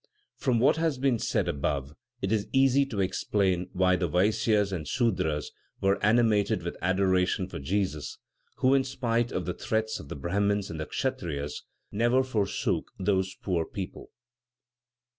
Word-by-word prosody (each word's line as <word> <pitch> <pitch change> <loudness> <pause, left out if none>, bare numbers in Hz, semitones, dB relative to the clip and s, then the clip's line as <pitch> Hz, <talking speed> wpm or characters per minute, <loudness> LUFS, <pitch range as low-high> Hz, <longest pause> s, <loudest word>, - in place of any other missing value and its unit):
From 125 -5 +1
what 130 +6 +4
has 160 -4 0
been 130 -3 +1
said 95 - 0
above, 70 -3 -2 0.3
it 95 - 0
is 110 -2 +1
easy 135 +1 +4
to 105 -7 -2
explain 95 -1 0
why 95 0 +3
the 90 -1 0
Vaisyas 105 +3 +2
and 85 -5 -4
Sudras 80 - 0 0.3
were 100 +1 +1
animated 105 -2 +3
with - - -4
adoration 95 0 +2
for 95 - -7
Jesus, 90 0 -2 0.4
who, 130 +1 +3
in 135 -1 +4
spite 120 -3 -1
of 90 - -2
the 90 - -2
threats 110 +2 -2
of 70 - -11
the - - -5
Brahmins 100 +6 0
and 80 - -6
Kshatriyas, 75 - -3 0.3
never 120 +5 +3
forsook 110 -6 -1
those 95 -1 0
poor 90 -4 0
people. 95 +1 -7
100 Hz, 150 wpm, -28 LUFS, 90-115 Hz, 0.4 s, what